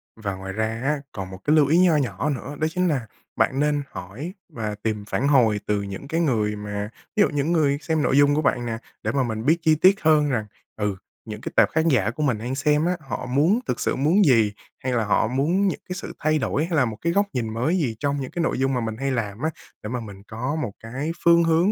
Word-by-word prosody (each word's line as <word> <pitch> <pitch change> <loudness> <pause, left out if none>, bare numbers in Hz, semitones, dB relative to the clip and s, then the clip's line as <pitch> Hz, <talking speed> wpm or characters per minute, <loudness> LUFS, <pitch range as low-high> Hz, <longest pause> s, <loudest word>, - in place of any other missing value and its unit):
Và 105 -3 -4
ngoài 95 0 -6
ra 110 +2 0 0.2
á, 145 0 0
còn 95 -2 -6
một 95 - -8
cái 150 +1 +3
lưu 145 -3 +5
ý 160 - +4
nho 180 -3 +5
nhỏ 125 +1 -1
nữa, 140 +1 -4
đó 155 - +2
chính 180 0 +1
là 130 -8 -1 0.3
bạn 135 - +1
nên 145 -1 +1
hỏi 115 - -7 0.2
và 110 -7 -4
tìm 105 -2 -2
phản 135 +5 -1
hồi 115 -7 +4
từ 105 -1 +1
những 100 +7 -7
cái 165 +3 0
người 110 -8 +1
mà 105 0 -4 0.3
ví 210 - +3
dụ - - +5
những 145 +2 -1
người 145 -4 +2
xem 160 -2 0
nội 140 - +2
dung 145 0 +5
của 155 - +2
bạn 120 -4 +1
nè, 115 -1 -3 0.3
để - - 0
mà 135 -2 +1
mình 110 0 -3
biết 160 +3 +4
chi 155 -1 +4
tiết 185 +5 +4
hơn 150 -2 +4
rằng, 110 -5 -1 0.3
ừ, 105 -2 -1 0.3
những 105 0 -7
cái - - -5
tệp - - +5
khán 160 +1 +1
giả 110 -7 +2
của 150 +5 -3
mình 125 -6 +1
đang 125 +4 -4
xem 150 +3 +2
á 180 0 0
họ 135 -4 -5
muốn 155 - +3
thực - - -1
sự - - 0
muốn 165 +9 +3
gì, 115 -7 +4 0.3
hay 130 -1 -1
là 115 -3 +1
họ 105 - +2
muốn 160 - +1
những - - -1
cái 180 - -3
sự - - -6
thay 155 0 +2
đổi 145 +2 0
hay 170 -1 -1
là 130 - +4
một 110 -2 -5
cái 170 0 0
góc 200 +2 +3
nhìn 115 -3 -2
mới 140 +11 +1
gì 125 -10 -1
trong 140 -1 -1
những 130 - -5
cái 175 - -2
nội 145 - 0
dung 135 0 +1
mà 125 - 0
mình 110 -1 -3
hay 135 +1 -1
làm 110 -2 -3
á, 160 - +1 0.3
để 105 - -5
mà 125 +1 -2
mình 100 -3 -10
có 125 +7 -3
một 120 -10 -2
cái 130 +8 -4
phương 170 0 +6
hướng, 165 +5 +3
135 Hz, 270 wpm, -24 LUFS, 110-155 Hz, 0.3 s, phương